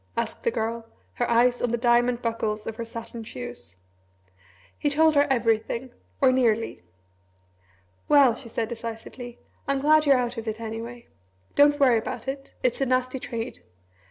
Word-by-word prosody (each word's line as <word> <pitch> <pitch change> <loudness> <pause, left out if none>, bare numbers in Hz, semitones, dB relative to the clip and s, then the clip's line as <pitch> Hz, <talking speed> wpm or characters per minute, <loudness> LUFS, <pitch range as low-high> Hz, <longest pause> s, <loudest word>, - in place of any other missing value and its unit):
asked 230 -1 -2
the - - +1
Girl, 230 0 -2 0.3
her 240 - -1
eyes 245 +1 +3
on 245 - +1
the 235 - 0
diamond 240 0 +2
buckles 220 -2 -2
of 225 - -5
her 235 - -3
satin 230 0 -8
shoes. 120 - -8 1.0
He 295 - 0
told 315 +2 +4
her 290 0 +4
everything 235 0 0 0.3
or 265 -2 +5
nearly. 230 - +1 1.3
"Well," 280 -5 +6
she 240 0 -9
said 225 0 -2
decisively, 235 +1 -7 0.3
"I'm 275 0 +1
glad 305 +2 +4
you're 275 -2 +6
out 245 -1 -2
of 225 - -8
it, 220 0 -3
anyway. 230 +2 -6 0.5
Don't 290 +1 +5
worry 250 -5 +5
about 235 +2 -6
it. 270 0 -6
It's 250 +1 +1
a - - +3
nasty 255 +1 0
trade. 230 -2 -5
235 Hz, 160 wpm, -25 LUFS, 225-260 Hz, 1.3 s, Well